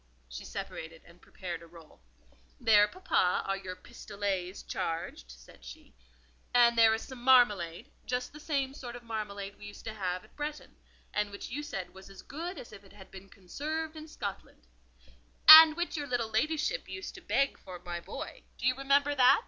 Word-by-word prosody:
She -, -, -9 dB
separated 160 Hz, 0 st, -7 dB
and 170 Hz, +1 st, -19 dB
prepared 175 Hz, -3 st, -7 dB
a 170 Hz, -, -13 dB
roll. 165 Hz, -, -17 dB, 0.6 s
"There, 210 Hz, -3 st, +5 dB
papa, 210 Hz, -, 0 dB
are 195 Hz, -, 0 dB
your 190 Hz, -2 st, -7 dB
'pistolets' 200 Hz, -4 st, -5 dB
charged," 165 Hz, -, -4 dB
said -, -, -15 dB
she. -, -, -12 dB, 0.6 s
"And 240 Hz, -1 st, +6 dB
there 225 Hz, -1 st, +6 dB
is 225 Hz, -, -6 dB
some 260 Hz, -2 st, -10 dB
marmalade, 240 Hz, -, +3 dB, 0.2 s
just 250 Hz, +1 st, -3 dB
the 300 Hz, -, -11 dB
same 275 Hz, -3 st, -2 dB
sort 245 Hz, -3 st, -8 dB
of 245 Hz, -, -10 dB
marmalade 205 Hz, -3 st, -6 dB
we 205 Hz, -, -9 dB
used 205 Hz, -, -12 dB
to 220 Hz, -, -5 dB
have 185 Hz, -3 st, -3 dB
at -, -, -21 dB
Bretton, 300 Hz, 0 st, -6 dB, 0.4 s
and 210 Hz, 0 st, 0 dB
which 200 Hz, +2 st, -8 dB
you 290 Hz, +5 st, -3 dB
said 195 Hz, -11 st, -6 dB
was 190 Hz, +1 st, -13 dB
as 195 Hz, -, -13 dB
good 340 Hz, +5 st, -6 dB
as 240 Hz, -, -10 dB
if 200 Hz, -1 st, -12 dB
it 195 Hz, -, -18 dB
had 195 Hz, -2 st, -15 dB
been 195 Hz, 0 st, -12 dB
conserved 310 Hz, -, -5 dB
in 310 Hz, 0 st, -9 dB
Scotland—" 200 Hz, -, -7 dB, 0.8 s
"And 315 Hz, 0 st, +12 dB
which 345 Hz, 0 st, -2 dB
your 290 Hz, -2 st, -3 dB
little 240 Hz, -3 st, -1 dB
ladyship 305 Hz, -, -1 dB
used 390 Hz, 0 st, -7 dB
to -, -, -11 dB
beg 275 Hz, 0 st, 0 dB
for 185 Hz, -1 st, -9 dB
my 175 Hz, 0 st, -6 dB
boy—do 270 Hz, -, -9 dB
you 255 Hz, -, +4 dB
remember 280 Hz, +2 st, +2 dB
that?" 255 Hz, -3 st, +6 dB
220 Hz, 185 wpm, -30 LUFS, 190-280 Hz, 0.8 s, And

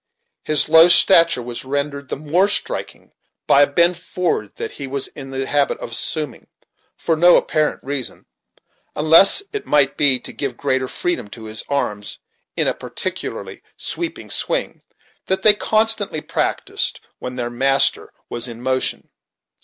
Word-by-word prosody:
His 155 Hz, -1 st, +4 dB
low 160 Hz, +2 st, +7 dB
stature 170 Hz, -6 st, +5 dB
was 120 Hz, 0 st, -7 dB
rendered 140 Hz, 0 st, -4 dB
the -, -, -3 dB
more 155 Hz, +7 st, +1 dB
striking 205 Hz, -, -3 dB, 0.3 s
by 140 Hz, -, +4 dB
a 145 Hz, -, +5 dB
bend 170 Hz, +4 st, +3 dB
forward 180 Hz, -, -3 dB
that -, -, -5 dB
he 140 Hz, -, -7 dB
was 135 Hz, 0 st, -3 dB
in 135 Hz, -2 st, -10 dB
the 135 Hz, 0 st, -3 dB
habit 145 Hz, 0 st, 0 dB
of -, -, -8 dB
assuming, 150 Hz, +5 st, -2 dB, 0.5 s
for 165 Hz, -, -1 dB
no 175 Hz, +2 st, +5 dB
apparent 155 Hz, -1 st, -1 dB
reason, 135 Hz, -2 st, -4 dB, 0.7 s
unless 165 Hz, -, +6 dB
it 420 Hz, -, -5 dB
might 140 Hz, -2 st, +2 dB
be 135 Hz, -3 st, +3 dB
to -, -, -4 dB
give 140 Hz, -, -4 dB
greater 130 Hz, -2 st, -1 dB
freedom 175 Hz, -5 st, -3 dB
to 110 Hz, +2 st, -12 dB
his 110 Hz, 0 st, -4 dB
arms, 105 Hz, -8 st, -3 dB, 0.4 s
in -, -, +1 dB
a -, -, +1 dB
particularly -, -, -6 dB, 0.2 s
sweeping -, -, -5 dB
swing, -, -, -2 dB, 0.5 s
that 190 Hz, -, -1 dB
they 215 Hz, -, +8 dB
constantly 215 Hz, -5 st, 0 dB
practised -, -, -2 dB, 0.2 s
when 125 Hz, 0 st, -7 dB
their 120 Hz, -1 st, -4 dB
master 135 Hz, +3 st, +2 dB, 0.2 s
was 120 Hz, +1 st, -1 dB
in 115 Hz, -1 st, -9 dB
motion. 130 Hz, +1 st, -2 dB
140 Hz, 155 wpm, -19 LUFS, 130-170 Hz, 0.7 s, they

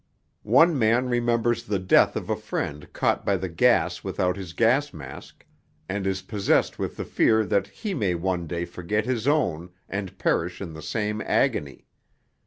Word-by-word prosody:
One 165 Hz, -4 st, +4 dB
man 120 Hz, +3 st, +2 dB
remembers 120 Hz, -1 st, +1 dB
the 100 Hz, -1 st, 0 dB
death 95 Hz, 0 st, +4 dB
of -, -, -4 dB
a -, -, 0 dB
friend 75 Hz, +1 st, -5 dB
caught -, -, 0 dB
by -, -, +1 dB
the -, -, -4 dB
gas -, -, +2 dB
without 90 Hz, 0 st, -1 dB
his 95 Hz, -4 st, -8 dB
gas 130 Hz, +6 st, +2 dB
mask, 70 Hz, -3 st, -11 dB, 0.4 s
and 95 Hz, 0 st, -2 dB
is 95 Hz, 0 st, -2 dB
possessed 100 Hz, 0 st, +1 dB
with -, -, -4 dB
the -, -, -4 dB
fear 110 Hz, 0 st, +3 dB
that 100 Hz, +1 st, +1 dB
he 210 Hz, -3 st, -5 dB
may 100 Hz, -, 0 dB
one 90 Hz, 0 st, -2 dB
day 85 Hz, +2 st, -3 dB
forget 95 Hz, +5 st, -2 dB
his 125 Hz, -1 st, -1 dB
own 90 Hz, -, +1 dB, 0.2 s
and 95 Hz, -1 st, -5 dB
perish 90 Hz, -2 st, 0 dB
in 90 Hz, -5 st, -6 dB
the 80 Hz, -, -9 dB
same 105 Hz, +7 st, -2 dB
agony. 70 Hz, -2 st, 0 dB
100 Hz, 175 wpm, -25 LUFS, 90-115 Hz, 0.4 s, One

